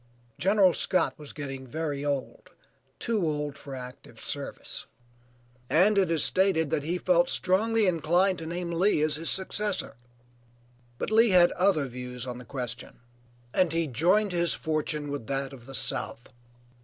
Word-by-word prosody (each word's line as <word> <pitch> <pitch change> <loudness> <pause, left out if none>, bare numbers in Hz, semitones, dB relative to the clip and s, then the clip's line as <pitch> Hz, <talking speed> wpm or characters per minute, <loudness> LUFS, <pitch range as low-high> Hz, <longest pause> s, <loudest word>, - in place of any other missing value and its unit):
General 195 -1 +4
Scott 185 +1 +1
was 150 -2 -9
getting 135 -3 -7
very 145 0 -3
old, 140 -2 -3 0.5
too 230 -3 -1
old 150 -2 -2
for 140 -1 -9
active 125 0 -10
service, - - -4 0.8
and 195 +6 +4
it 195 -3 +3
is 165 -2 +2
stated 185 -6 +3
that - - +1
he 165 +5 -2
felt 175 -1 +2
strongly 220 +4 +2
inclined 180 +2 +2
to 160 - -6
name 175 +1 -4
Lee 170 -2 +2
as 155 -1 +1
his 165 +1 -2
successor, 200 +1 0 1.0
but - - -4
Lee 225 +1 +5
had 180 -2 +6
other 180 -6 +2
views 125 -1 -6
on 125 -1 -6
the 125 - -11
question 125 -2 -6 0.5
and 180 -3 +2
he 165 0 +1
joined 175 - +2
his 170 -1 +2
fortune 155 -2 -2
with 140 -6 -5
that 135 0 -2
of 120 -2 -13
the 135 - -6
South. 120 - 0
160 Hz, 155 wpm, -27 LUFS, 140-185 Hz, 1.0 s, had